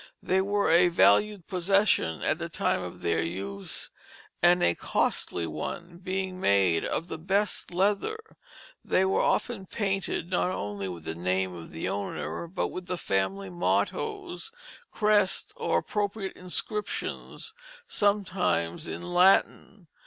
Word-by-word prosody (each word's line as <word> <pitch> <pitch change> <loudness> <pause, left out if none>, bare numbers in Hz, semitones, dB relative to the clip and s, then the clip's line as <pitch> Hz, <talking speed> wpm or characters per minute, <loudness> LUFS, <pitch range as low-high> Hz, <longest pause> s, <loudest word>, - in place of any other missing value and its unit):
They 190 +1 +2
were 200 0 +1
a 175 +2 +6
valued 175 - +4
possession 190 - +2
at - - +1
the - - -4
time - - 0
of - - -8
their 85 -1 +2
use, 95 +4 -4 0.5
and 175 +1 +5
a 85 - +4
costly 85 0 0
one, 170 - -5
being, 185 0 -3
made 95 - +3
of 165 - -2
the 175 - -6
best 195 +5 0
leather. 200 - +1 0.7
They 190 - +2
were 190 - +2
often 210 -6 0
painted 195 -4 -2
not 180 0 +2
only 100 - -3
with 85 -3 -7
the 80 - -4
name 90 +2 -1
of 85 -2 -9
the 80 - -4
owner, 100 - -3
but 180 - -2
with 185 0 -7
family 95 0 -1
mottoes, 355 - -1 0.4
crests, 210 -3 +2
or - - +1
appropriate 205 -1 -2
inscriptions, 210 - -3 0.3
sometimes 185 - +1
in - - -5
Latin. 185 +1 +3
180 Hz, 130 wpm, -28 LUFS, -, 0.7 s, a